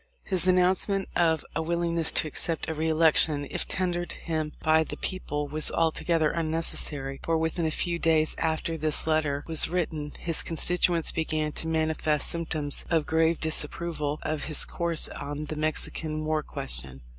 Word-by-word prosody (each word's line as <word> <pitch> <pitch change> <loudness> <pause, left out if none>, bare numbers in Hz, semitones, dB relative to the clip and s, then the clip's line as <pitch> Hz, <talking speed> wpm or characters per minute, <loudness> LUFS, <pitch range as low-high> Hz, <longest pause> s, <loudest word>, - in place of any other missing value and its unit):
His 185 -2 +1
announcement 185 +2 +2
of 160 -3 +2
a 165 - 0
willingness 170 0 0
to - - +2
accept 160 +2 -2
a 160 - -2
re 160 +1 -1
election 155 -2 +3
if - - -1
tendered 175 -1 -2
him 155 -2 -4
by 160 0 +4
the - - -7
people 150 -6 -3
was 150 +2 +2
altogether 165 -1 +1
unnecessary, 155 -4 +2
for 165 0 0
within 160 +1 -1
a - - +1
few 170 +2 -2
days 160 -1 +3
after 160 0 -1
this 155 0 +2
letter 155 -3 0
was 160 -2 +2
written 160 -4 -3
his 165 -2 +1
constituents 170 0 +1
began 155 -1 -2
to 160 - -4
manifest 155 -2 0
symptoms 160 -4 -3
of 160 -3 +1
grave 160 +1 +1
disapproval 155 -1 -3
of 155 -1 -3
his 155 - +6
course 170 -2 -1
on 145 +1 -6
the 155 - -5
Mexican 155 0 -2
war 155 0 0
question. 65 - -2
160 Hz, 160 wpm, -27 LUFS, 155-165 Hz, -, his